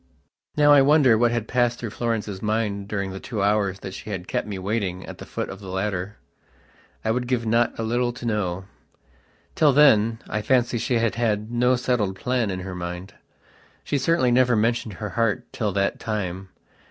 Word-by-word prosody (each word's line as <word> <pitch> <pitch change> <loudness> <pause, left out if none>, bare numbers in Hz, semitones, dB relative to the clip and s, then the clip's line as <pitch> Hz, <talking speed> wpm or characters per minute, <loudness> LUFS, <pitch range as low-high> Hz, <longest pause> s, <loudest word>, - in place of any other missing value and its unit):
Now 145 0 +6
I 145 - +7
wonder 140 -4 +5
what 120 +2 +3
had 115 -2 -2
passed 120 -1 +1
through 115 -3 -5
Florence's 110 -5 -3
mind 105 -2 -1
during 100 -2 -3
the 95 - -6
two 105 -3 -3
hours 100 -2 +1
that 95 - -7
she - - -8
had 95 -3 -5
kept - - -2
me 100 -2 -4
waiting 95 -2 -2
at - - -10
the - - -9
foot - - -4
of 95 - -8
the 100 - -10
ladder. 95 +1 -3 0.9
I 110 - +2
would 125 +1 -1
give 120 -2 0
not 115 +2 +1
a 115 - -2
little 120 +2 0
to 120 - -9
know. 95 -5 -1 0.9
Till 150 -3 +4
then, 115 -6 +5
I 105 - -2
fancy 120 0 +1
she 125 - 0
had 115 -1 +1
had 110 -2 -1
no 125 +1 +3
settled 120 -6 0
plan 125 0 -1
in 95 -1 -3
her 95 0 -6
mind. 90 +1 -6 0.7
She 140 - -1
certainly 135 -3 +2
never 125 0 +4
mentioned 115 0 0
her 105 +3 -5
heart 115 +1 0
till 105 -3 -1
that 100 0 0
time. 95 -3 -4
110 Hz, 195 wpm, -24 LUFS, 100-120 Hz, 0.9 s, I